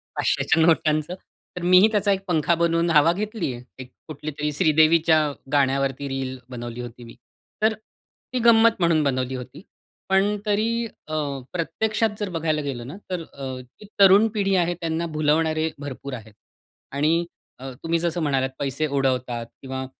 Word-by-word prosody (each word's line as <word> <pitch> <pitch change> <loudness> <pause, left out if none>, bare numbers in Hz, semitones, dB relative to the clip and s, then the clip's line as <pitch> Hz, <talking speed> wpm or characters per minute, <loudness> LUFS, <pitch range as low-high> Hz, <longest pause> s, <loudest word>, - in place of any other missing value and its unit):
500च्या. 160 -1 +2 0.4
तर - - -4
मीही 185 +3 +6
त्याचा 205 -1 +2
एक 195 0 0
पंखा 165 -1 +2
बनवून 170 0 +1
हवा 155 +1 +5
घेतली 210 - -3
आहे. 125 +2 -11 0.2
कुठलीतरी 150 0 -4
श्रीदेवीच्या 160 +1 +4 0.3
गाण्यावरती 135 -1 +1
रील 135 -1 -4
बनवली 120 -1 -6
होती 120 0 -9
मी. 115 - -12 0.5
तर 220 +1 +3 0.6
ती 255 - 0
गंमत 230 -1 +5
म्हणून 165 -3 +3
बनवली 130 -2 -1
होती. 125 +3 -9 0.5
पण 195 +2 +3
तरी 225 +3 0 0.2
अ, 155 - -7 0.4
प्रत्यक्षात 215 +6 0
जर 205 -2 -2
बघायला 155 -1 0
गेलं 130 -4 -5
ना 145 - -8
तर 180 -2 -2
अ, 130 -2 -6
ती 125 - -17
तरुण 200 +3 +7
पिढी 195 -3 +1
आहे 175 -1 +2
त्यांना 165 0 -1
भुलवणारे 155 +1 +1
भरपूर 140 -1 -7
आहेत. 110 -3 -9 0.6
आणि 155 +5 +1 0.3
अ, 135 +1 -7
तुम्ही 165 0 0
जसं 170 0 -1
म्हणालात 135 -3 +1
पैसे 140 +3 -1
उडवतात 130 -4 -1 0.2
किंवा 130 0 -5
155 Hz, 145 wpm, -23 LUFS, 135-180 Hz, 0.6 s, तरुण